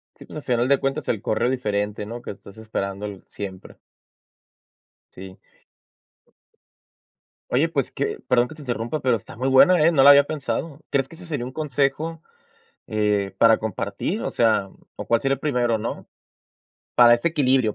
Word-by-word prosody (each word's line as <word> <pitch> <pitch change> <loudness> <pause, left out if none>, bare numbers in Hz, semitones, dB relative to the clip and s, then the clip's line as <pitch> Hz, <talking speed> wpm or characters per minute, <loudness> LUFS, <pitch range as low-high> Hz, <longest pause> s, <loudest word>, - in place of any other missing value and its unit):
Sí, - - -14
pues, - - -10
al 150 - -7
final 120 -1 +1
de 140 0 +3
cuentas 135 +1 -2
el 110 -3 -1
correo 115 +3 0
diferente, 105 -4 -2
¿no?, 120 +2 -7
que - - -7
estás 100 0 -14
esperando 100 -2 -4
l 100 -2 -7
siempre. 95 -2 -9 1.4
Sí. 95 0 -11 2.1
Oye, - - +3
pues - - -2
que - - -3
perdón 125 -1 +3
que 155 - -11
te 155 - -13
interrumpa, 120 +2 -3
pero, 130 -4 +2
está 100 - -13
muy 130 +3 -1
buena, 155 +5 +6
¿eh?, 165 - +5
no 135 -5 +4
la 140 - +10
había 140 0 +7
pensado. 150 0 -4
¿Crees 135 -1 +1
que 165 - -14
ese 180 +2 -13
sería 145 -7 -4
un - - -8
consejo, 150 +3 -1 0.6
eh, 105 -2 0
para 115 -1 +5
compartir? 110 -3 -3
O - - -1
sea, 110 -4 +2
mm, - - -20 0.2
¿o - - -6
cuál 115 - +2
sería 135 0 +1
el - - -16
primero, 125 -6 0
¿no?, 110 - -5 0.9
para 120 -1 +7
este 120 +7 0
equilibrio 130 -8 +1
125 Hz, 180 wpm, -23 LUFS, 110-140 Hz, 2.1 s, la